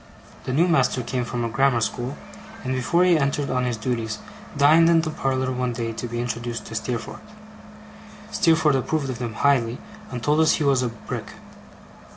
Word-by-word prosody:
The - - -2
new 160 +7 +3
master 155 -6 +2
came 125 0 -2
from 120 0 -3
a - - 0
grammar 125 +2 +2
school; 120 +4 -3 0.5
and 130 -1 -2
before 150 +8 +2
he 175 -3 +4
entered 140 0 0
on 125 0 0
his 120 -2 -1
duties, 115 -2 -2 0.4
dined 155 +4 +6
in 165 -1 +5
the 160 -1 -3
parlour 130 -3 -1
one 125 -1 -1
day, 115 -1 -3
to 115 +2 -5
be 120 0 -4
introduced 120 -1 -4
to - - -9
Steerforth. 115 +1 -4 1.1
Steerforth 160 -3 +3
approved 140 +1 -1
of 120 - -7
him 120 -3 -4
highly, 125 -2 +2 0.3
and 125 -2 -6
told 150 +4 +2
us 160 0 +5
he 155 - 0
was 135 -3 +3
a 125 - 0
Brick. 115 -1 -7
130 Hz, 190 wpm, -23 LUFS, 120-145 Hz, 1.1 s, dined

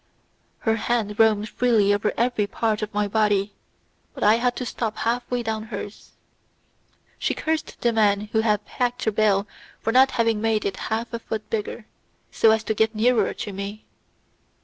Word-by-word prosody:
Her 225 -1 +1
hand 220 -2 -1
roamed 215 -1 +4
freely 220 -4 +2
over 205 +1 0
every 235 -3 +1
part 220 0 -1
of 215 0 -3
my 210 0 0
body, 205 -1 +1 0.6
but - - -4
I 215 +2 +5
had 245 +1 0
to 250 - -4
stop 225 -2 -3
half 240 +1 -1
way 245 -1 -1
down 220 -1 -3
hers. 215 -2 -8 1.1
She - - 0
cursed 315 0 -3
the 235 -1 +2
man 205 -2 +3
who 220 - +3
had 210 -2 +1
packed 245 0 -2
the 220 - +2
bale 205 -1 +2 0.3
for 225 - -1
not 260 +1 +6
having 230 -4 +1
made 220 -1 +1
it 195 - -2
half 230 +2 -2
a 235 - -2
foot 220 -2 -5
bigger, 215 +1 -3 0.5
so 225 - +4
as 220 0 +3
to 220 - -1
get 220 +1 +1
nearer 235 +2 +2
to 205 - -6
me. 200 +2 -6
220 Hz, 180 wpm, -24 LUFS, 210-230 Hz, 1.1 s, not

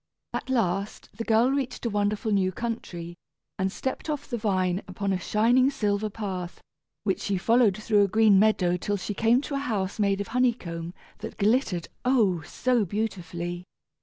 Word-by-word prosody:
At - - -4
last 200 -5 -1
the 230 - -4
girl 230 +3 +3
reached 265 -3 -2
a - - +1
wonderful 205 +1 0
new 190 -2 +2
country, 180 -6 -5 0.5
and 190 0 0
stepped 265 +8 -4
off 290 -2 -3
the 245 - -3
vine 190 -4 0
upon 195 +1 -2
a 185 - -1
shining 235 +7 +3
silver 210 -6 -1
path, 190 -4 -5 0.4
which 195 -3 0
she 200 -2 -1
followed 225 0 +3
through 215 -1 +2
a - - -1
green 215 -1 +5
meadow 185 -4 +3
till 205 +3 -2
she 200 +2 -4
came 230 +5 +3
to 290 - -6
a 275 - 0
house 210 -8 -2
made 200 -1 +2
of 200 - -4
honey 250 0 +3
comb 170 -4 -7 0.2
that - - -7
glittered, 205 - +1 0.2
oh! 220 -10 +3
so 240 - 0
beautifully. 175 -4 -4
205 Hz, 175 wpm, -26 LUFS, 185-235 Hz, 0.5 s, green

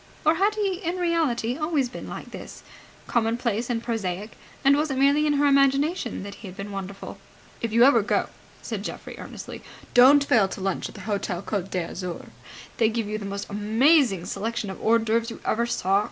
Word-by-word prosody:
Or 310 - +6
had 410 +2 +2
he 395 -4 0
in 345 +2 -2
reality 315 -10 0
always 305 -4 +1
been 245 - -8
like - - -8
this, - - -9 0.4
commonplace 235 0 0
and 235 -1 -1
prosaic, 210 -3 -3 0.3
and 275 +1 +7
was 300 +2 0
it 270 - -2
merely 285 +3 +4
in 295 - +3
her 290 0 +2
imagination 275 - +2
that 200 0 -7
he 210 - -8
had 185 - -10
been 200 +1 -6
wonderful? 195 0 -7 0.4
"If 230 - -2
you 235 +2 +5
ever 255 -3 +6
go," 205 - 0 0.3
said - - -4
Geoffrey, - - -6
earnestly, - - -8 0.3
"don't 270 +4 +7
fail 220 -8 +4
to 195 - -7
lunch 190 -1 -2
at - - -14
the 200 - -9
Hotel 195 -3 -3
Côte 195 -3 -3
d'Azur. 180 0 -4 0.5
They 225 -2 +4
give 225 0 -2
you 215 +1 -3
the 205 - -6
most 200 +1 -5
amazing 220 - +3
selection 225 0 -3
of 190 - -9
hors 230 +1 +4
d'oeuvres 230 +1 +1
you 230 - -8
ever 235 +2 +1
saw. 195 -4 +2
230 Hz, 195 wpm, -25 LUFS, 200-280 Hz, 0.5 s, and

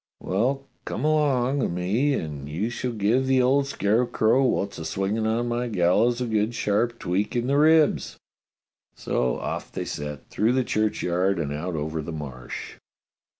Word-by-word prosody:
"Well, 130 +8 -1 0.2
come 125 - -3
along 140 -3 +2
o' - - +1
me 105 +12 0
and 75 - -5
you 95 +10 -2
shall 125 +1 -3
give 115 +4 +1
the 130 -1 +3
old 135 +2 +3
scarecrow 115 +2 +2
wot's 100 -8 0
a - - -5
swing 95 +6 -1
on 115 +2 0
my 120 +1 -1
gallows 110 +4 +2
a - - 0
good 110 0 0
sharp 115 +3 0
tweak 100 +4 -1
in 120 0 0
the 140 +2 +2
ribs." 155 0 +3 0.8
So 60 -1 -1
off - - -5
they - - -4
set 75 0 -6
through 110 +3 +2
the 130 0 +2
church 110 -2 0
yard 90 +3 +1
and 75 -3 -2
out 85 +4 -3
over 80 +1 -3
the 75 - -6
Marsh. 70 -5 -7
110 Hz, 170 wpm, -25 LUFS, 90-125 Hz, 0.8 s, the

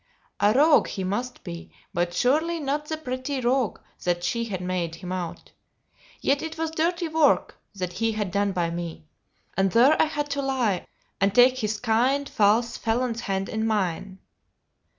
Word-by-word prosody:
A 205 - +4
rogue 290 +3 +5
he 190 - -4
must 240 +7 -3
be, 85 -1 -8 0.2
but 175 0 0
surely 310 - +1
not 295 +1 -2
the 315 - -3
petty 260 -1 -3
rogue 250 -3 +1 0.3
that 175 -1 0
she 235 +5 -1
had 195 -5 -4
made 180 -2 -2
him 180 +1 -8
out. 180 -2 -5 0.7
Yet 280 +1 +2
it 320 0 -5
was 320 0 -2
dirty 340 +2 0
work 315 -2 +2 0.2
that 180 -2 -4
he 225 +3 0
had 210 -3 -2
done 200 +1 +1
by 175 -3 -1
me; 170 -2 -6 0.5
and 195 0 +2
there 255 +7 +6
I - - +5
had 295 -2 -3
to 280 0 -1
lie 250 -9 0 0.3
and 195 +1 +2
take 255 +1 +6
his 215 -2 -1
kind, 250 +5 +1
false, 220 +2 +2
felon's 235 +1 -1
hand 195 0 -2
in 220 0 -1
mine. 195 -3 -1
225 Hz, 170 wpm, -25 LUFS, 190-280 Hz, 0.7 s, there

